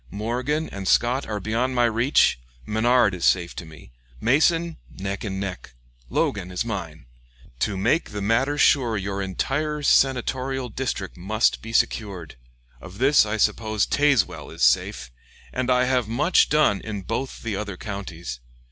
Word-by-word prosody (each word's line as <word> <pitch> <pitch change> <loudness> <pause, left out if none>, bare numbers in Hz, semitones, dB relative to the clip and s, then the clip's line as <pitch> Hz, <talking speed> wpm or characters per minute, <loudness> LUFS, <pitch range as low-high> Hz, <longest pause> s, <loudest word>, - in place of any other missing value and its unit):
Morgan 125 - -2
and 100 -1 -6
Scott 125 +7 +2
are 105 -1 -3
beyond 115 +6 -1
my 120 - +3
reach, 115 - +3 0.3
Menard 115 - +3
is 90 -2 -6
safe 85 -2 +2
to 85 - -6
me; 80 -6 -14 0.3
Mason, 165 - +2
neck 95 +1 -5
and 95 -3 -4
neck; 95 -10 -6 0.3
Logan 95 -3 -1
is 90 +4 -3
mine. 85 - -5 0.5
To 100 -3 -1
make 115 - +1
the 105 - -5
matter 120 +8 +1
sure 120 -6 +3
your 100 0 -3
entire 145 +10 -2
senatorial 130 -1 +1
district 110 -6 -4
must 105 +6 +1
be 115 - -8
secured. 100 -8 -1 0.5
Of 90 +1 -11
this 135 -2 +4
I 110 +1 -2
suppose 110 0 +1
Tazewell 145 -7 +1
is - - -5
safe, - - +2 0.4
and 130 - -2
I 125 0 +4
have 125 -3 +1
much 145 +10 +3
done 150 -10 +3
in 105 -3 -5
both 125 +7 -4
the 110 -3 -2
other 100 -2 -5
counties. 85 - -6
110 Hz, 155 wpm, -24 LUFS, 95-130 Hz, 0.5 s, this